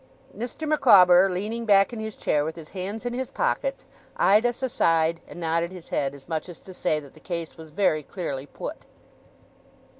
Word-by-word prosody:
Mr. 250 +7 -5
Micawber, 195 -11 +6
leaning 210 +6 -3
back 200 0 +4
in 230 - -5
his 220 -1 -5
chair 145 - +1
with 160 +1 -4
his 160 -2 -11
hands 200 +5 -5
in 245 - -2
his 260 +1 -3
pockets, - - -1 0.3
eyed 215 +5 +5
us 245 +2 -4
aside, 165 -9 +2
and - - -10
nodded 165 0 0
his 180 -3 -11
head, 140 0 -1
as 140 - -15
much 160 +1 -3
as 175 - -10
to 190 - -12
say 165 -4 0
that 140 -3 -14
the - - -17
case 170 -2 -5
was 160 -1 -11
very 155 -2 +1
clearly 145 -5 -5
put. - - -6
180 Hz, 190 wpm, -25 LUFS, 160-220 Hz, 0.3 s, Micawber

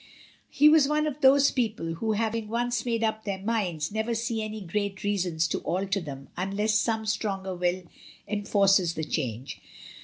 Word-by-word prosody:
235 - - -17
He 300 - +8
was 305 -3 +5
one 300 +1 +1
of 300 -1 -4
those 275 +1 +6
people 215 -9 -1
who, 220 +6 -1
having 220 0 -1
once 240 +1 -1
made 230 -1 0
up 220 0 -1
their 200 -2 -3
minds, 190 -7 -2
never 220 +2 -1
see 230 0 -2
any 215 0 -5
great 200 +1 -3
reasons 180 -5 0
to - - -2
alter 195 +2 -1
them 140 -4 -8
unless 200 +4 -1
some 220 0 +1
stronger 195 -3 -2
will 180 +1 -1 0.4
enforces 195 -4 +2
the 160 - -3
change. 130 -5 -4
210 Hz, 175 wpm, -27 LUFS, 185-230 Hz, 0.4 s, He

